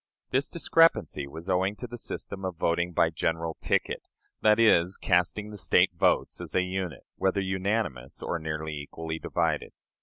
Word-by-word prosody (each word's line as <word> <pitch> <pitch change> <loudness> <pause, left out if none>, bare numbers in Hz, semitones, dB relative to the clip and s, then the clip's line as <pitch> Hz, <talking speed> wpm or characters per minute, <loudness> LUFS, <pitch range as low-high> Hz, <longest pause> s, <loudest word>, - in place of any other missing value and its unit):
This 135 +2 +1
discrepancy 165 - +3
was 80 +5 -9
owing 95 +2 +1
to 125 - -7
the 120 0 -7
system 95 -3 -5
of 95 -2 -3
voting 85 +2 +1
by 80 -1 +2
"general 80 0 -1
ticket" - - -1 0.3
that 110 0 +5
is, 95 -5 +4
casting 95 +4 +1
the 105 - -8
State - - +4
votes - - +1
as - - -6
a 90 - +4
unit, 90 -5 -4
whether 95 +1 +1
unanimous 95 - -2
or 85 - -2
nearly 80 0 -4
equally 80 +2 -6
divided. 80 -3 -1
90 Hz, 160 wpm, -28 LUFS, 80-100 Hz, 0.3 s, that